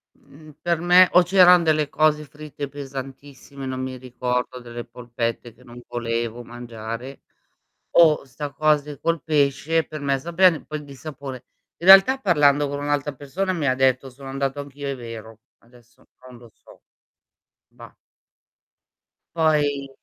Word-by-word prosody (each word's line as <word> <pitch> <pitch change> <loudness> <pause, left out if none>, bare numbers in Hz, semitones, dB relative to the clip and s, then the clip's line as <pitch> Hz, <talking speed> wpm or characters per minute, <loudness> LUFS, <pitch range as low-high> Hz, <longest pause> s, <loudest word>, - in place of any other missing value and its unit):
Mhmm, 155 +2 -17
per 170 -1 0
me 180 +2 +6
o 180 - +6
c'eran 180 -1 +6
delle 155 -2 +1
cose 150 0 +1
fritte 150 0 -8
pesantissime, 135 0 -9
non 130 0 -4
mi 130 0 -5
ricordo 125 0 -3
delle 120 -1 -8
polpette 115 -1 -5
che 125 +3 -22
non 120 -1 -13
volevo 115 0 -3
mangiare 120 +2 -8 0.8
o 160 -4 +5
'sta 140 +2 -7
cose 150 -1 0
col 165 -3 -1
pesce 150 +2 +1
per 155 -1 -8
me 140 -1 0
sapeva 170 +3 +3
in - - -12
poi 155 -1 -6
di 140 -1 -12
sapone. 135 -2 -9 0.3
In 170 - -7
realtà 195 +8 +8
parlando 145 - +3
con 140 - -4
un'altra 145 0 -2
persona 180 +8 -3
mi 160 -5 -2
ha 130 - +2
detto: 130 0 +1
"Sono 135 +2 -12
andato 135 +1 -3
anch'io, 140 0 -7
è 140 - -3
vero", 115 -2 -10 0.2
adesso 120 0 -24 0.2
non 125 -1 -13
lo 120 -1 -16
so, - - -20 0.9
bah. - - -15 1.4
Poi 145 -4 +1
140 Hz, 150 wpm, -22 LUFS, 125-155 Hz, 1.4 s, realtà